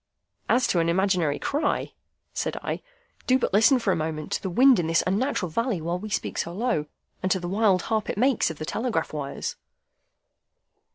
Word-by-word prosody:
"As 250 Hz, +1 st, +4 dB
to 175 Hz, -, +1 dB
an 165 Hz, 0 st, +1 dB
imaginary 180 Hz, -4 st, +1 dB
cry," 295 Hz, +3 st, -1 dB, 0.4 s
said -, -, -2 dB
I, -, -, -3 dB, 0.5 s
"do 255 Hz, -, +5 dB
but 250 Hz, -, -2 dB
listen 225 Hz, +7 st, +6 dB
for 225 Hz, -5 st, 0 dB
a -, -, +2 dB
moment 155 Hz, -1 st, -4 dB
to -, -, -1 dB
the 190 Hz, -, -3 dB
wind 255 Hz, +5 st, +5 dB
in 165 Hz, -, -1 dB
this 165 Hz, 0 st, +2 dB
unnatural 200 Hz, -, 0 dB
valley 230 Hz, +1 st, 0 dB
while 170 Hz, +3 st, -2 dB
we 215 Hz, +3 st, -7 dB
speak -, -, -2 dB
so 170 Hz, -, -2 dB
low, 195 Hz, -7 st, -1 dB, 0.3 s
and 185 Hz, -, -1 dB
to 190 Hz, -, +2 dB
the 175 Hz, -, -5 dB
wild 195 Hz, -1 st, +2 dB
harp 220 Hz, -2 st, -1 dB
it -, -, -3 dB
makes 255 Hz, -2 st, +2 dB
of 160 Hz, -, -7 dB
the 155 Hz, -, -5 dB
telegraph 220 Hz, -5 st, -2 dB
wires." 140 Hz, -2 st, -4 dB
190 Hz, 195 wpm, -25 LUFS, 165-230 Hz, 0.5 s, listen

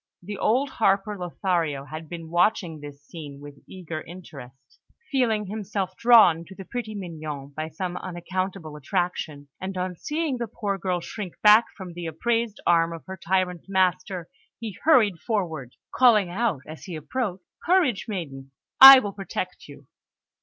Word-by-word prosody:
The 205 Hz, +2 st, -6 dB
old 260 Hz, +5 st, +1 dB
harper, 200 Hz, -1 st, +1 dB
Lothario, 170 Hz, -6 st, -2 dB
had 155 Hz, +1 st, -8 dB
been 165 Hz, -2 st, -8 dB
watching 175 Hz, -2 st, +1 dB
this 145 Hz, -1 st, -11 dB
scene 145 Hz, -3 st, -9 dB
with 145 Hz, -1 st, -12 dB
eager 170 Hz, -4 st, -7 dB
interest, 135 Hz, -7 st, -13 dB, 0.3 s
feeling 230 Hz, -6 st, +1 dB
himself 200 Hz, -2 st, -4 dB
drawn 220 Hz, -9 st, +6 dB
to 190 Hz, -, -13 dB
the 195 Hz, -, -9 dB
pretty 220 Hz, -1 st, -5 dB
Mignon 155 Hz, -7 st, -7 dB
by 155 Hz, 0 st, -3 dB
some 175 Hz, +3 st, -4 dB
unaccountable 185 Hz, -2 st, -5 dB
attraction; 150 Hz, -3 st, -3 dB
and 190 Hz, 0 st, -5 dB
on 180 Hz, 0 st, -3 dB
seeing 300 Hz, -, -2 dB
the 235 Hz, -, -2 dB
poor 200 Hz, -3 st, -3 dB
girl 180 Hz, -1 st, -1 dB
shrink 190 Hz, -1 st, -7 dB
back 215 Hz, +2 st, +8 dB
from 185 Hz, -4 st, -8 dB
the 175 Hz, -1 st, -6 dB
upraised 230 Hz, +6 st, -1 dB
arm 170 Hz, -1 st, +3 dB
of 165 Hz, -, -10 dB
her 190 Hz, -, -7 dB
tyrant 180 Hz, -1 st, -1 dB
master, 185 Hz, -1 st, 0 dB, 0.3 s
he 220 Hz, -5 st, -6 dB
hurried 220 Hz, -, +4 dB
forward, 160 Hz, -, -3 dB, 0.2 s
calling 215 Hz, -8 st, +4 dB
out 205 Hz, -, -1 dB
as 155 Hz, +1 st, -10 dB
he 180 Hz, -, -6 dB
approached: 185 Hz, -, -4 dB, 0.2 s
"Courage, 340 Hz, -, +2 dB
maiden! 140 Hz, -10 st, -6 dB, 0.3 s
I 270 Hz, 0 st, +14 dB
will 205 Hz, -6 st, -1 dB
protect 190 Hz, -2 st, -6 dB
you!" 145 Hz, -1 st, -14 dB
185 Hz, 155 wpm, -25 LUFS, 160-210 Hz, 0.3 s, I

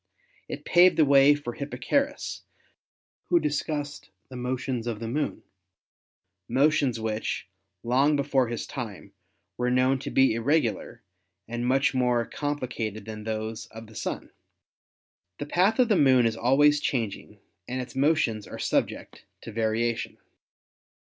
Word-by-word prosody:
It -, -, -6 dB
paved 180 Hz, +1 st, +5 dB
the 155 Hz, -, +5 dB
way 140 Hz, +1 st, +6 dB
for 145 Hz, -5 st, -6 dB
Hipparchus, 150 Hz, -, -2 dB, 0.9 s
who 175 Hz, -, +5 dB
discussed 150 Hz, -3 st, -3 dB, 0.2 s
the 130 Hz, -, -10 dB
motions 125 Hz, -1 st, -3 dB
of 115 Hz, -3 st, -3 dB
the 115 Hz, -, -5 dB
Moon, 145 Hz, +6 st, -2 dB, 1.1 s
motions 135 Hz, -1 st, +2 dB
which, 110 Hz, 0 st, -3 dB, 0.4 s
long 135 Hz, +5 st, +3 dB
before 135 Hz, -3 st, +1 dB
his 115 Hz, 0 st, -4 dB
time, 110 Hz, -7 st, -7 dB, 0.4 s
were 125 Hz, 0 st, 0 dB
known 130 Hz, +1 st, +2 dB
to -, -, -5 dB
be 135 Hz, -3 st, +4 dB
irregular 115 Hz, -2 st, -1 dB, 0.4 s
and 120 Hz, +2 st, -3 dB
much 135 Hz, +3 st, +2 dB
more 125 Hz, -2 st, +1 dB
com 145 Hz, 0 st, -3 dB
plicated 110 Hz, -5 st, -4 dB
than 110 Hz, -1 st, -8 dB
those 110 Hz, 0 st, -4 dB
of 110 Hz, 0 st, -11 dB
the 110 Hz, -, -16 dB
Sun. -, -, -5 dB, 1.1 s
The -, -, -4 dB
path 185 Hz, +8 st, +2 dB
of 250 Hz, -2 st, +4 dB
the 215 Hz, -, +3 dB
Moon 130 Hz, -6 st, +5 dB
is 115 Hz, -1 st, +1 dB
always 145 Hz, +5 st, +4 dB
changing 115 Hz, -8 st, -3 dB, 0.3 s
and 130 Hz, +1 st, -3 dB
its 125 Hz, +1 st, -7 dB
motions 135 Hz, -7 st, +1 dB
are -, -, -8 dB
subject -, -, -2 dB, 0.2 s
to -, -, -8 dB
variation. 115 Hz, +1 st, -1 dB
130 Hz, 140 wpm, -26 LUFS, 115-145 Hz, 1.1 s, way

